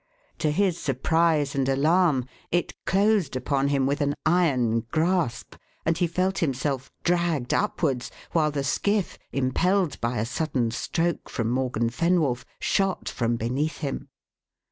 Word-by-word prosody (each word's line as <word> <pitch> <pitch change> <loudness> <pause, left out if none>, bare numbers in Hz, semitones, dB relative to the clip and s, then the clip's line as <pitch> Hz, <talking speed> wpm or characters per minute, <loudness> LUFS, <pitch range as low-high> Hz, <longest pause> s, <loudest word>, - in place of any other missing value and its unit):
To 155 - +1
his 180 +2 +1
surprise 150 +2 +1
and 135 -1 0
alarm, 150 0 +3 0.3
it 175 +1 0
closed 195 -7 +2
upon 135 +2 0
him 140 -2 +2
with 140 +3 0
an 145 0 +1
iron 135 -9 +3
grasp, 165 -6 0 0.3
and 160 - +2
he 175 +1 +1
felt 185 +3 0
himself 135 -4 -1
dragged 170 -7 +1
upwards, 145 -11 0 0.2
while 155 -3 +2
the 145 -2 -2
skiff, 200 +8 0
impelled 170 +7 +1
by 120 0 -1
a 105 - 0
sudden 125 -2 -1
stroke 165 +7 -1
from 115 0 -1
Morgan 125 -3 0
Fenwolf, 155 -5 +1
shot 195 -2 0
from 120 -2 0
beneath 130 +7 -1
him. 140 -3 -4
150 Hz, 140 wpm, -26 LUFS, 130-175 Hz, 0.3 s, alarm